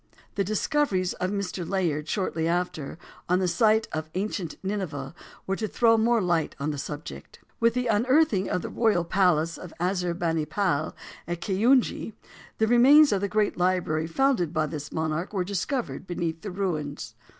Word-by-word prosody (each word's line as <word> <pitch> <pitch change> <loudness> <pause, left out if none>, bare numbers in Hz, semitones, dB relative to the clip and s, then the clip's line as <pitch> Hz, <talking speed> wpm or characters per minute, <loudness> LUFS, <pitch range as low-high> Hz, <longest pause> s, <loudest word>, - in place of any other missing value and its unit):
The 200 - 0
discoveries 205 - 0
of 185 - -2
Mr. 200 -2 -3
Layard, 165 -5 -1
shortly 165 -5 -1
after, 170 -4 -2 0.3
on 180 - +4
the 185 0 +1
site 215 +5 +3
of 155 0 -4
ancient 190 -4 -3
Nineveh, 175 -9 -4 0.3
were 195 - -1
to 215 +2 -3
throw 230 +1 +3
more 225 -1 +2
light 170 -3 0
upon 150 +2 -2
the 145 - -5
subject. 150 +2 -7 0.2
With 230 0 +3
the 250 0 0
unearthing 235 -1 +2
of 180 - -1
the - - -4
royal 220 -7 +2
palace 170 -3 +2
of 180 - -9
Assur 180 -1 0
bani 165 -3 -1
pal, 155 -3 -1 0.3
at 175 0 -3
Keyunji, 225 +5 +2 0.4
the 220 - +3
remains 265 +6 +6
of 200 -2 +1
the 200 - -1
great 210 +1 +1
library 175 -3 +1
founded 205 - +1
by 155 -2 +1
this 150 -1 -6
monarch 160 +4 -2
were 190 -3 0
discovered 200 +3 -3
beneath 170 -2 -3
the 205 - -5
ruins. 170 -7 -3
185 Hz, 170 wpm, -26 LUFS, 165-215 Hz, 0.4 s, remains